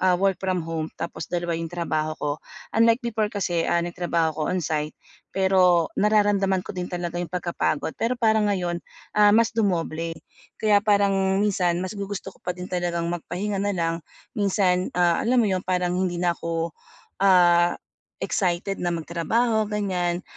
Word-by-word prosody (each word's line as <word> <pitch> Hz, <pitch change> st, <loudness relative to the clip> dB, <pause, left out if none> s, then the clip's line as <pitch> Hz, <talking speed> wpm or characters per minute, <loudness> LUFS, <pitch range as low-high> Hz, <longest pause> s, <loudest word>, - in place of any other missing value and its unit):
ah, 185 Hz, -1 st, +4 dB
work 195 Hz, 0 st, +1 dB
from 185 Hz, -2 st, -1 dB
home 165 Hz, -1 st, -3 dB
tapos -, -, -5 dB
dalawa 175 Hz, -1 st, -2 dB
yung 165 Hz, 0 st, -4 dB
trabaho 155 Hz, -2 st, -2 dB
ko. 150 Hz, -, -2 dB, 0.4 s
Unlike 230 Hz, +2 st, +4 dB
before 220 Hz, -2 st, 0 dB
kasi, 180 Hz, -5 st, -1 dB
ah, 170 Hz, 0 st, +2 dB
nagtrabaho 170 Hz, -2 st, 0 dB
ako 155 Hz, -, -7 dB
on-site, 155 Hz, -4 st, -2 dB, 0.4 s
pero 185 Hz, -3 st, +4 dB
nararamdaman 205 Hz, -3 st, +3 dB
ko -, -, -6 dB
din 180 Hz, -2 st, -4 dB
talaga 175 Hz, -1 st, -4 dB
yung 175 Hz, -, -4 dB
pagkapagod 170 Hz, -3 st, -1 dB
pero 235 Hz, +2 st, +1 dB
parang 220 Hz, -2 st, +3 dB
ngayon, 175 Hz, -4 st, -1 dB, 0.4 s
ah, 205 Hz, 0 st, +7 dB
mas 230 Hz, 0 st, +4 dB
dumoble. 170 Hz, -6 st, -1 dB, 0.4 s
Kaya 210 Hz, -2 st, +4 dB
parang 200 Hz, -2 st, +2 dB
minsan, 180 Hz, -4 st, +1 dB
mas 185 Hz, -, -4 dB
gugusto 200 Hz, -1 st, -5 dB
ko -, -, -24 dB
pa 180 Hz, -, -3 dB
din 180 Hz, +1 st, -7 dB
talagang 175 Hz, -1 st, -1 dB
magpahinga 185 Hz, +4 st, -3 dB
nalang. 170 Hz, -5 st, 0 dB, 0.3 s
Minsan, 190 Hz, -3 st, +1 dB
ah, 175 Hz, -1 st, +3 dB
alam 245 Hz, +1 st, +3 dB
mo 210 Hz, -, +1 dB
yun, 185 Hz, -1 st, 0 dB
parang 180 Hz, -1 st, 0 dB
hindi 185 Hz, -2 st, 0 dB
na 175 Hz, -1 st, +3 dB
ako, 165 Hz, 0 st, -3 dB, 0.5 s
ah, 175 Hz, -3 st, +5 dB, 0.5 s
excited 185 Hz, 0 st, -1 dB
na 175 Hz, -1 st, -1 dB
magtrabaho, 215 Hz, +8 st, 0 dB
ganiyan. 185 Hz, -4 st, -1 dB
180 Hz, 160 wpm, -24 LUFS, 170-205 Hz, 0.5 s, ah